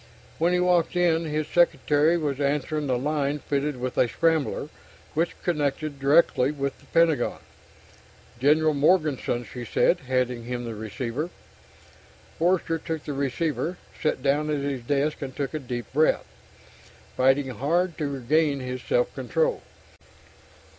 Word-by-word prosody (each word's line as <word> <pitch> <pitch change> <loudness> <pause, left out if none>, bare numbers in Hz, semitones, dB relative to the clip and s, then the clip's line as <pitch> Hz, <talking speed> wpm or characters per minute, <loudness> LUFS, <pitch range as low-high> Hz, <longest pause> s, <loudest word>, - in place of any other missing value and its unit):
When 170 +2 +3
he 180 - +2
walked 180 -1 +2
in, 170 -2 +2
his 155 -1 -2
secretary 160 -1 +3
was 145 -4 -2
answering 145 +1 0
the 130 -2 +1
line 145 +1 0
fitted 145 -1 -2
with 125 0 -3
a - - +5
scrambler, 160 0 0 0.4
which 165 +3 -1
connected 150 -3 -1
directly 140 -2 +4
with 140 -2 -3
the - - -21
Pentagon. 165 -2 +2 1.0
"General 155 +4 +4
Morganson," 145 -5 +1
she 125 +1 -8
said, 170 +8 +2
handing 125 -2 0
him 120 0 -4
the 115 - -4
receiver. 115 - -4 1.1
Forster 165 -1 +1
took 160 -1 -4
the 145 - -3
receiver, 140 +4 -1 0.2
sat 155 -4 0
down 150 +2 +1
at 150 -2 0
his 140 -3 -2
desk 145 +4 -1
and 130 -2 -5
took 140 0 -3
a 155 - -2
deep 120 -3 -6
breath, 155 +3 +3 0.9
fighting 135 +1 +3
hard 160 - 0
to 150 - 0
regain 140 +2 +1
his 125 0 -5
self - - 0
control. 485 +1 0
145 Hz, 140 wpm, -25 LUFS, 130-160 Hz, 1.1 s, a